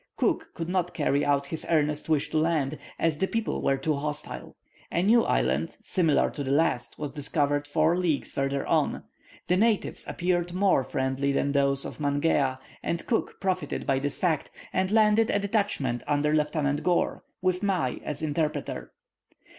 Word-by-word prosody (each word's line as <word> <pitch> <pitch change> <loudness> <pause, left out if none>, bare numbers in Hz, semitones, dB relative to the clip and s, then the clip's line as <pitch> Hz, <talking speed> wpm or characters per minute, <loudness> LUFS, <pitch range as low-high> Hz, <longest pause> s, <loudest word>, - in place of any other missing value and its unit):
Cook - - 0
could 165 - -4
not 180 -1 -1
carry 145 -2 +1
out 140 -1 +2
his 160 +3 -4
earnest 150 -2 +1
wish 155 -3 +1
to 155 - +2
land, 155 -3 0 0.2
as 160 -2 0
the 190 - +1
people 225 +1 -2
were 135 - +2
too 150 +3 0
hostile. 150 +1 -5 0.4
A 170 - +1
new 225 +4 +5
island, 65 +6 0
similar 165 -5 +2
to 145 - -5
the 135 - -4
last, 140 -4 +1
was 150 -2 -4
discovered 145 0 0
four 155 +3 +2
leagues 175 -5 0
further 135 0 -1
on. - - +1 0.4
The 180 - +2
natives 220 0 +1
appeared 175 -1 -1
more 185 -7 +3
friendly 130 +2 -1
than 140 0 +1
those 140 -1 +1
of - - -7
Mangea, 145 -2 +1 0.2
and 170 - -2
Cook 230 - -1
profited 185 -1 -2
by 135 -2 +2
this 145 +1 -2
fact, 165 -5 0 0.2
and 185 0 +1
landed 215 +1 +4
a - - +2
detachment 200 - 0
under 150 +1 +1
Lieutenant 150 -1 +1
Gore, 175 +2 0 0.2
with 185 0 0
Mai 185 -11 0
as 150 +1 -4
interpreter. 155 -1 -2
155 Hz, 170 wpm, -27 LUFS, 140-180 Hz, 0.4 s, new